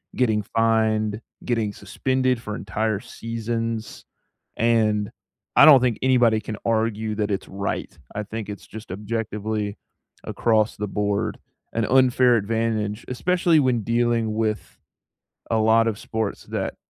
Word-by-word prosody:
getting 110 Hz, -4 st, +2 dB
fined, 110 Hz, -1 st, +2 dB, 0.2 s
getting 115 Hz, -4 st, -1 dB
suspended 130 Hz, +5 st, -1 dB
for 105 Hz, -2 st, -5 dB
entire 105 Hz, +2 st, -2 dB
seasons. 115 Hz, 0 st, -4 dB, 0.5 s
And 110 Hz, -3 st, +2 dB, 0.5 s
I -, -, +8 dB
don't 145 Hz, -5 st, +9 dB
think 125 Hz, -3 st, 0 dB
anybody 120 Hz, -4 st, +4 dB
can 105 Hz, 0 st, -6 dB
argue 110 Hz, -1 st, 0 dB
that 105 Hz, -1 st, -1 dB
it's 100 Hz, -, -2 dB
right. 100 Hz, +1 st, -4 dB, 0.2 s
I 105 Hz, +1 st, -4 dB
think 110 Hz, 0 st, -6 dB
it's 105 Hz, -, -8 dB
just 110 Hz, -3 st, -10 dB
objectively 105 Hz, 0 st, -3 dB, 0.5 s
across 110 Hz, -2 st, +1 dB
the 105 Hz, 0 st, -3 dB
board 105 Hz, +1 st, -1 dB, 0.4 s
an 115 Hz, -1 st, +1 dB
unfair 130 Hz, -1 st, +4 dB
advantage, 110 Hz, 0 st, -1 dB
especially 170 Hz, +4 st, +2 dB
when 125 Hz, -4 st, +1 dB
dealing 115 Hz, -1 st, +1 dB
with 110 Hz, -1 st, -2 dB, 0.7 s
a 115 Hz, -, +3 dB
lot 110 Hz, +1 st, +4 dB
of 105 Hz, -, -5 dB
sports 110 Hz, -2 st, -3 dB
that -, -, -3 dB
110 Hz, 130 wpm, -23 LUFS, 105-115 Hz, 0.7 s, don't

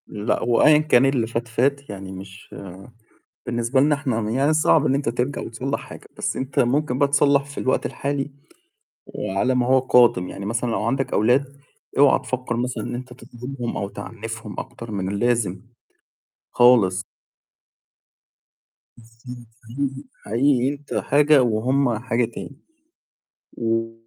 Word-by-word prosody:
لأ، 105 Hz, +2 st, -2 dB
هو 120 Hz, -1 st, +2 dB
أيًا 150 Hz, 0 st, +7 dB
كان 150 Hz, -4 st, +4 dB
اللي 130 Hz, -4 st, +1 dB
فات، 115 Hz, +1 st, -3 dB
فات، 140 Hz, +4 st, 0 dB
يعني 95 Hz, -1 st, -7 dB
مش 95 Hz, +1 st, -11 dB, 0.9 s
بالنسبة 120 Hz, +2 st, 0 dB
لنا 150 Hz, +1 st, +3 dB
إحنا 130 Hz, -6 st, -2 dB
م 105 Hz, -, -3 dB
يعني 135 Hz, +6 st, +2 dB
صعب 155 Hz, -1 st, +3 dB
إن 135 Hz, -, +2 dB
أنت 140 Hz, -4 st, -1 dB
ترجع 125 Hz, +4 st, -2 dB
وتصلّح 130 Hz, +5 st, -4 dB
حاجة، -, -, -12 dB
بس -, -, -2 dB
أنت 135 Hz, +1 st, -3 dB
ممكن 130 Hz, +1 st, +1 dB
بقى 140 Hz, -, +4 dB
تصلّح 140 Hz, 0 st, +3 dB
في 140 Hz, 0 st, -12 dB
الوقت 130 Hz, -, 0 dB
الحالي، 140 Hz, 0 st, -3 dB, 0.7 s
وعلى 115 Hz, +7 st, -1 dB
ما 125 Hz, -1 st, +2 dB
هو 130 Hz, +1 st, +5 dB
قادم، 120 Hz, -8 st, +4 dB
يعني 100 Hz, -, -7 dB
مثلًا 115 Hz, +3 st, -1 dB
لو 105 Hz, -, -1 dB
عندك 135 Hz, +4 st, -1 dB
أولاد، 125 Hz, +6 st, +3 dB, 0.5 s
اوعا 140 Hz, 0 st, +6 dB
تفكّر 130 Hz, -2 st, -4 dB
مثلًا 125 Hz, +1 st, -2 dB
إن 120 Hz, -, -4 dB
أنت 125 Hz, 0 st, -8 dB
تظلمهم 125 Hz, 0 st, -7 dB
أو 100 Hz, -, -3 dB
تعنّفهم 115 Hz, 0 st, -7 dB
أكتر 115 Hz, -1 st, -8 dB
من 95 Hz, -2 st, -3 dB
اللازم. 110 Hz, -3 st, 0 dB, 0.9 s
خالص. 105 Hz, -7 st, +4 dB, 1.9 s
بس 115 Hz, 0 st, -21 dB
أنت 120 Hz, -1 st, -9 dB, 0.2 s
حقيقي 135 Hz, +2 st, -3 dB, 0.2 s
حقيقي 130 Hz, +3 st, +2 dB
أنت 145 Hz, 0 st, -7 dB
حاجة 145 Hz, 0 st, +4 dB
وهم 120 Hz, +2 st, +1 dB
حاجة 120 Hz, 0 st, 0 dB
تاني. 120 Hz, +4 st, -9 dB, 1.0 s
و 115 Hz, 0 st, -1 dB
125 Hz, 145 wpm, -22 LUFS, 115-140 Hz, 1.9 s, أيًا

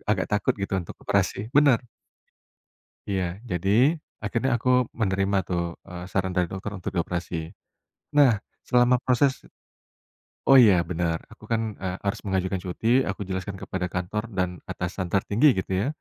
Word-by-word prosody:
agak -, -, -2 dB
takut 105 Hz, -, +2 dB
gitu 100 Hz, -1 st, -4 dB
untuk 85 Hz, -, -8 dB
operasi 110 Hz, +4 st, 0 dB
bener. 140 Hz, -4 st, +5 dB, 1.3 s
Iya 95 Hz, -2 st, 0 dB, 0.3 s
jadi, 90 Hz, +2 st, -1 dB, 0.5 s
akhirnya 115 Hz, +5 st, 0 dB
aku 125 Hz, -, 0 dB, 0.3 s
menerima 100 Hz, -1 st, +1 dB
tuh, 85 Hz, -2 st, 0 dB, 0.3 s
eee, 90 Hz, 0 st, -7 dB
saran 95 Hz, -1 st, 0 dB
dari 90 Hz, -1 st, +2 dB
dokter 95 Hz, +2 st, -5 dB
untuk 90 Hz, -, -5 dB
dioperasi, 85 Hz, 0 st, -2 dB, 0.8 s
nah 145 Hz, -4 st, +7 dB, 0.4 s
selama 125 Hz, 0 st, +4 dB
proses 130 Hz, +2 st, +2 dB, 1.1 s
oh 135 Hz, -, +9 dB
iya 100 Hz, -4 st, +6 dB
bener 85 Hz, -1 st, 0 dB
aku -, -, -16 dB
kan, 115 Hz, -1 st, +2 dB, 0.2 s
eee, 90 Hz, 0 st, -2 dB
harus 100 Hz, -, 0 dB
mengajukan 95 Hz, 0 st, 0 dB
cuti 90 Hz, +5 st, -3 dB, 0.2 s
aku -, -, -4 dB
jelaskan 95 Hz, +1 st, -3 dB
kepada 95 Hz, -1 st, -3 dB
kantor 90 Hz, +4 st, -2 dB
dan 90 Hz, -1 st, +2 dB, 0.2 s
atasan 90 Hz, +1 st, -3 dB
tertinggi 105 Hz, +8 st, +3 dB
gitu 95 Hz, -, -5 dB
ya. 120 Hz, -, 0 dB
95 Hz, 145 wpm, -25 LUFS, 90-115 Hz, 1.3 s, oh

